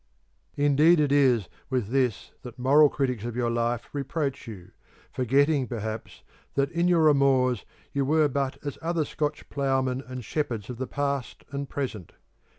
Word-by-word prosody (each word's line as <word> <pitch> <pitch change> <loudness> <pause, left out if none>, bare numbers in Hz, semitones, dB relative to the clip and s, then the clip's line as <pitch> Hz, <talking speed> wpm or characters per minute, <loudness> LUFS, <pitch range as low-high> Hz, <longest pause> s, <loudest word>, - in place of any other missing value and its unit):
Indeed 145 +4 +5
it 145 -2 +2
is 130 -8 +3 0.2
with 125 -6 -1
this 125 -4 0
that 120 -2 -10
moral 140 +4 +5
critics 125 -7 -2
of 120 -1 -4
your 120 -1 0
life 120 0 -1
reproach 140 -1 -3
you, 95 -5 -10 0.4
forgetting, 135 +2 +2
perhaps, 110 -2 -6 0.3
that 140 0 +1
in 170 +1 +1
your 170 -3 +4
amours 135 -5 +3 0.3
you 140 - +1
were 155 +2 +3
but 135 -1 -2
as 145 - -5
other 165 -1 0
Scotch 150 +1 -3
ploughmen 135 -2 0
and 130 -2 -7
shepherds 120 -8 -3
of 120 - -9
the 130 - -3
past 140 -2 -3
and 140 -1 -4
present. 115 - -5
135 Hz, 155 wpm, -26 LUFS, 125-145 Hz, 0.4 s, Indeed